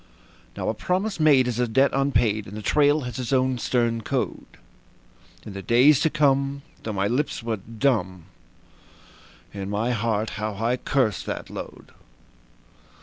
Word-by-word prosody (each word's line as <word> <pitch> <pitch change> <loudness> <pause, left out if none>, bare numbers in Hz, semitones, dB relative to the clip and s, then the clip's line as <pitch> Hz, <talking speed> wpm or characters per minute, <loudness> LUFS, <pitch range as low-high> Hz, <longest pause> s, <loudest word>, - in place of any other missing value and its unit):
Now - - -3
a - - +1
promise 190 +2 -2
made 140 -5 +5
is 120 -1 -2
a 125 - +2
debt 135 +5 +3
unpaid, 120 -6 +1
and 100 +2 -8
the 105 - -7
trail 145 +5 +3
has 125 -1 -6
its 125 -1 -4
own 130 -1 +1
stern 115 -2 0
code. - - -3 1.0
In 105 - -8
the 100 - -6
days 125 +6 +5
to 160 - +2
come, 140 -2 +1 0.2
though 110 - -4
my 100 0 0
lips 125 +3 -1
were 115 -1 -2
dumb, 105 - -1 1.3
in 100 -1 -5
my 110 +4 -1
heart 110 -2 -1
how 105 -1 -2
I 115 +5 0
cursed 125 -7 0
that - - -5
load. - - -9
120 Hz, 155 wpm, -24 LUFS, 110-140 Hz, 1.3 s, made